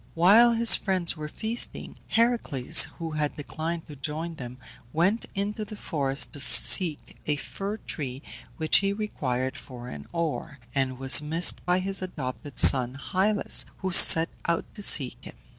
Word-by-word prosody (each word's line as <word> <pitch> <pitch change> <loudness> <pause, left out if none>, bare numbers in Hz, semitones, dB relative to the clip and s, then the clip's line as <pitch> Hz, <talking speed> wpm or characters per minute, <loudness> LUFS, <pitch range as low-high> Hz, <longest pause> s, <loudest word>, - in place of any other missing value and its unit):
While 210 +8 +4
his 230 0 +6
friends 185 -4 -2
were 155 -1 -8
feasting, 220 +9 -4
Heracles, 225 - +2
who 165 -1 -7
had 150 -1 -4
declined 160 +3 -7
to 150 - -13
join 155 +4 -6
them, 125 -5 -10 0.3
went 190 +8 -2
into 205 +2 -5
the 215 0 -10
forest 140 -8 -1
to 145 - -11
seek 160 +3 +5
a 150 - -1
fir 200 +8 -7
tree 135 - -8 0.3
which 155 -1 +2
he 200 0 -1
required 130 - -5
for 125 -2 -12
an 70 0 -11
oar, 165 -3 -5 0.2
and 130 -1 -3
was 135 +2 +4
missed 160 +3 -1
by 180 0 +1
his 195 +1 -5
adopted 145 -6 -8
son 125 -1 +4 0.2
Hylas, 200 +2 +2
who 190 -1 -5
set 165 -1 +6 0.2
out 170 0 -2
to 210 - -12
seek 135 -10 +3
him. - - -13
165 Hz, 160 wpm, -24 LUFS, 140-195 Hz, 0.3 s, his